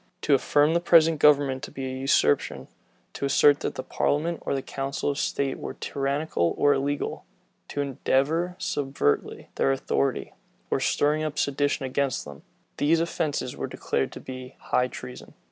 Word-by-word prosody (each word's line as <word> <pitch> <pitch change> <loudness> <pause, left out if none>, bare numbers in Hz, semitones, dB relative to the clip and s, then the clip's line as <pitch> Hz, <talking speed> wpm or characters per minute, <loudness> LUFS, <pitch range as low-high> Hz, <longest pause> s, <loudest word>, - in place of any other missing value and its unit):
To 150 - +3
affirm 145 +3 +3
the 170 - +3
present 165 -2 +5
government 140 -3 +4
to - - -6
be 135 - -6
a 130 0 -4
usurpation, 130 - +1 0.5
to - - -3
assert 145 +1 +5
that - - -3
the 130 - -4
parliament 160 +5 -1
or 140 - -1
council 135 +1 -2
of 140 - -4
state 135 -1 -1
were - - -6
tyrannical 140 - -1
or 145 - +4
illegal, 140 +1 -2 0.4
to 145 - -3
endeavor 145 +6 0
subverting 135 - -1
their 70 - +3
authority, 70 0 -1 0.4
or - - +2
stirring 150 +1 +1
up 155 -1 -3
sedition 140 -1 0
against 130 -1 -1
them: 70 -1 -10 0.4
these 160 +3 +3
offences 155 -6 -2
were - - -4
declared - - -2
to - - -8
be 130 0 -9
high 125 - 0
treason. 125 0 -10
140 Hz, 160 wpm, -26 LUFS, 130-150 Hz, 0.5 s, present